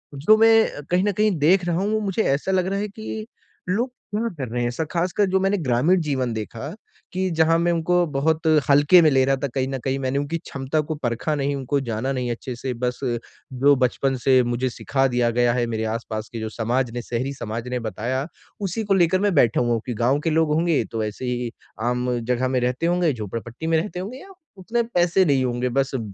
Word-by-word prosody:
जो 190 +11 +4
मैं 225 -8 +4
कहीं 180 +2 +2
न 205 - +2
कहीं 210 +2 +2
देख 175 +4 +4
रहा 175 - 0
हूँ 200 +3 0
वो 215 - +2
मुझे 200 +1 -1
ऐसा 150 +7 -1
लग 185 -1 +1
रहा 195 +1 -1
है 210 - -2
कि 215 +1 -7 0.4
लोग 235 +7 0 0.2
क्या 225 +3 0
कर 130 - -4
रहे 120 0 -1
हैं? 120 - +1
ऐसा 120 +7 -2
ख़ासकर 180 +4 +1
जो 190 0 +2
मैंने 195 +2 +1
ग्रामीण 155 +4 +2
जीवन 130 -5 -1
देखा 115 - -6 0.4
कि 185 0 0
जहाँ 160 0 +3
मैं 175 0 +2
उनको 175 +1 +2
बहुत 160 +4 +1 0.2
हल्के 145 +5 +6
में 155 - +5
ले 135 -1 +4
रहा 135 0 +2
था - - +2
कहीं 130 0 0
न 135 0 -3
कहीं 135 0 -1
मैंने 130 +1 -1
उनकी 145 +4 -2
क्षमता 140 0 -3
को 155 +1 -4
परखा 135 +3 -2
नहीं, 140 0 -1
उनको 140 +1 -1
जाना 120 +2 -2
नहीं 125 -2 -2
अच्छे 120 +1 -5
से, 125 +1 -4
बस 125 +1 -3 0.5
जो 140 +3 +4
बचपन 130 +1 +1
से 130 -1 +6
मुझे 120 +2 -1
सिखा 135 +2 -1
दिया 120 -2 +1
गया 120 0 +2
है, 120 -1 +1
मेरे 110 -1 -2
आस-पास 110 -1 -4
के 115 - -4
जो 110 0 -4
समाज 120 +2 -1
ने 120 - -3
शहरी 125 +4 -3
समाज 115 0 -5
ने 125 0 -2
बताया 120 +5 -3 0.3
उसी 200 +3 -2
को 200 -1 +1
लेकर 185 0 +3
मैं 205 -2 +2
बैठा 120 -4 +4
हूँ 120 -1 +1
कि 125 - -3
गाँव 120 +6 +1
के 165 +2 -1
लोग 160 -1 +2
होंगे, 165 -1 +2
तो 115 -1 -3
ऐसे 110 +4 -5
ही 125 -1 -2 0.3
आम 125 +1 0
जगह 125 +2 0
में 130 0 +1
रहते 125 +6 -1
होंगे, 175 -2 +2
झोपड़पट्टी 115 +6 -6
में 165 0 +3
रहते 180 +1 -3
होंगे 215 +8 -6
या 390 - -13 0.3
उतने 225 +6 -1
पैसे 180 -4 +2
नहीं 140 -4 +2
होंगे 125 +1 -1
बस 135 +2 0
अ, - - 0
140 Hz, 230 wpm, -23 LUFS, 125-175 Hz, 0.5 s, हल्के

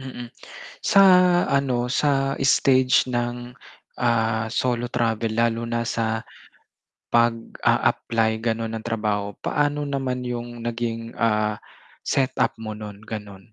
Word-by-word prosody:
Mm, 125 -3 -8 0.5
sa 195 - +5 0.5
ano, 130 -3 +1
sa 135 0 +1
stage 130 -1 +4
ng, 120 0 -3 0.4
ah, 115 -1 0
solo 120 0 -1
travel 115 -2 0
lalo 115 +1 +1
na 115 0 -2
sa, 110 -2 -1 0.9
pag-a-apply 115 -1 +1
ganun 115 -1 -2
ng 115 - -4
trabaho, 105 -3 -2
paano 145 0 -1
naman 135 -3 -2
yung 120 -1 -5
naging, 115 -1 -3
ah, 105 -2 +1 0.5
set 135 -1 +1
up - - +2
mo 110 -1 -5
nun 105 -2 -8
gano'n? 105 -1 -8
115 Hz, 115 wpm, -23 LUFS, 110-125 Hz, 0.9 s, sa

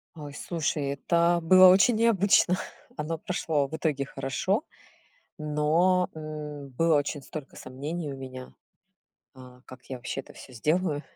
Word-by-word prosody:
Ой, 145 -2 -9
слушай, 150 -2 -2
это 170 +5 +2
было 185 +3 +8
очень 195 +5 +5
необычно. 200 -5 +3 0.4
Оно 160 +2 -3
прошло 155 -4 -1
в 160 - -6
итоге 150 -4 -1
хорошо, 135 - -2 0.7
но, 160 +4 +2
э, 150 -2 -7
было 160 +4 +2
очень 145 0 -2
столько 150 -1 -9
сомнений 145 +5 -5
у - - -9
меня, 130 -1 -9 0.8
э, 125 -1 -14
как 130 -1 -13
я 130 - -6
вообще 125 +2 -5
это 135 - -10
всё - - -13
сделаю. 150 +5 0
150 Hz, 140 wpm, -27 LUFS, 140-170 Hz, 0.8 s, было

